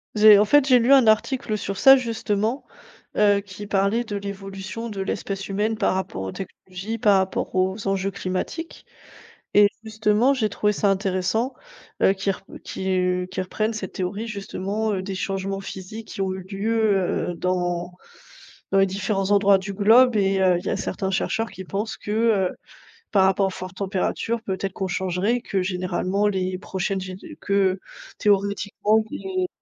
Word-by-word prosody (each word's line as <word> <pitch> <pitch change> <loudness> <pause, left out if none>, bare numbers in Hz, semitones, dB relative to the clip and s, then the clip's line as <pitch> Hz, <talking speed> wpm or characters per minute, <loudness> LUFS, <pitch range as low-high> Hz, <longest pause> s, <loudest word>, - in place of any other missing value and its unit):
J'ai 210 -1 +8
en 210 - +4
fait, 290 +6 +5
j'ai 255 -2 +6
lu 245 +4 +4
un 265 -3 +6
article 220 +1 +2
sur 195 -1 -4
ça 270 +5 +8
justement, 230 0 -2 0.5
heu, 205 -1 +4
qui 200 +1 -9
parlait 200 +4 +1
de 210 -3 -5
l'évolution 200 +3 -6
de 200 -2 -5
l'espèce 195 0 -3
humaine 210 +3 0
par 195 - +2
rapport 190 - -3
aux 95 0 -4
technologies, 195 +3 -7
par 205 -2 +4
rapport 190 -1 -2
aux 190 +3 0
enjeux 195 0 0
climatiques 200 - -5 0.7
et 205 0 +7 0.2
justement 220 +4 +2
j'ai 230 -5 0
trouvé 210 +1 0
ça 205 0 +1
intéressant, 195 +5 0 0.5
heu, - - +6
qu'il 195 0 -1
rep 190 - -12 0.2
qui 180 -1 -1
qui 185 - -3
reprenne 215 +4 -2
cette 200 -4 -6
théorie 200 +4 -3
justement, 205 +1 -3
heu, 185 - -2
des 195 0 -5
changements 195 +1 -3
physiques 195 +3 -8
qui 200 - -7
ont 190 -1 -1
eu 190 0 -6
lieu, 200 -1 0
heu, - - -4
dans 175 0 -1 0.8
dans 195 - +3
les 195 - +5
différents 195 +1 -2
endroits 200 -1 +5
du 195 +1 -6
globe 225 +5 +5
et 195 -1 +2
il 185 -2 +2
y - - -2
a - - 0
certains 190 +1 -3
chercheurs 225 +4 -1
qui 190 - -9
pensent 205 +4 -3
que, - - -8
heu, 215 -4 +2 0.6
par 195 -2 +4
rapport 190 +1 +3
aux - - -2
fortes 185 -1 -8
températures, 200 +4 -1
peut-être 195 -2 -3
qu'on 190 - -3
changerait, 190 +6 0
que 195 -4 -1
généralement 185 +2 -1
les 185 -2 -1
prochaines 190 0 -2
gén 185 0 -7 0.2
que 195 -2 +1 0.4
théoriquement 205 +1 +2
que - - -18
les 370 -1 -2
195 Hz, 170 wpm, -23 LUFS, 190-215 Hz, 0.8 s, J'ai